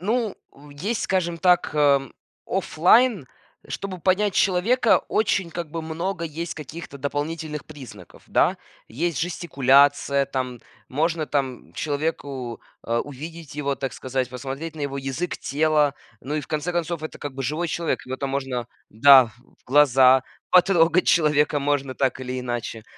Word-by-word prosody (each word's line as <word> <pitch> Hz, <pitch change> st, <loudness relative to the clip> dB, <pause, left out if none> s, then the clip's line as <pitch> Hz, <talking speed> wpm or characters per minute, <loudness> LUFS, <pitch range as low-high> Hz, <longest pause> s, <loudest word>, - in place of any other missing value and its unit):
Ну, 220 Hz, +2 st, -1 dB, 0.2 s
у 145 Hz, +1 st, -16 dB
есть, 195 Hz, +11 st, -3 dB
скажем 175 Hz, -3 st, -1 dB
так, 180 Hz, -2 st, +3 dB
эм, 140 Hz, -3 st, +3 dB, 0.3 s
офлайн. 195 Hz, -, +3 dB, 0.4 s
Чтобы 190 Hz, -2 st, -5 dB
понять 190 Hz, +2 st, +2 dB
человека, 210 Hz, +6 st, +3 dB
очень, 195 Hz, -4 st, +1 dB
как 170 Hz, 0 st, -5 dB
бы, 165 Hz, -1 st, -4 dB
много 170 Hz, +3 st, -3 dB
есть 165 Hz, +2 st, -5 dB
каких-то 155 Hz, 0 st, -9 dB
дополнительных 150 Hz, +2 st, -4 dB
признаков, 125 Hz, -, -12 dB
да? -, -, +2 dB, 0.3 s
Есть 160 Hz, +6 st, -2 dB
жестикуляция, 140 Hz, -4 st, +3 dB
там 130 Hz, -3 st, -4 dB, 0.3 s
можно, 160 Hz, +3 st, 0 dB
там, 135 Hz, -4 st, -3 dB
человеку, 140 Hz, -5 st, -3 dB, 0.2 s
а, 115 Hz, 0 st, 0 dB
увидеть 155 Hz, +2 st, -9 dB
его, 140 Hz, -2 st, -1 dB
так 135 Hz, -1 st, -4 dB
сказать, 130 Hz, 0 st, -3 dB
посмотреть 135 Hz, +6 st, -6 dB
на 150 Hz, -, -5 dB
его 140 Hz, -1 st, -3 dB
язык 140 Hz, +5 st, -3 dB
тела. 150 Hz, -1 st, +1 dB, 0.3 s
Ну 145 Hz, +4 st, -4 dB
и -, -, 0 dB
в -, -, -11 dB
конце 155 Hz, +3 st, -2 dB
концов, 170 Hz, -1 st, -2 dB
это, 155 Hz, -, -7 dB
как 145 Hz, -2 st, -6 dB
бы, 135 Hz, -, -4 dB
живой 155 Hz, +7 st, -1 dB
человек. 165 Hz, -3 st, -2 dB
Его 130 Hz, -, -4 dB
там 135 Hz, 0 st, -3 dB
можно, 130 Hz, -3 st, -3 dB, 0.2 s
да, 130 Hz, +4 st, +8 dB
в 110 Hz, -, -15 dB, 0.3 s
в -, -, -35 dB
глаза, 130 Hz, -2 st, +5 dB, 0.3 s
потрогать 180 Hz, -1 st, +4 dB
человека 150 Hz, -2 st, +3 dB
можно 140 Hz, -2 st, -1 dB
так 130 Hz, -1 st, 0 dB
или 130 Hz, 0 st, -4 dB
иначе. 120 Hz, -3 st, -4 dB
150 Hz, 150 wpm, -23 LUFS, 135-170 Hz, 0.4 s, да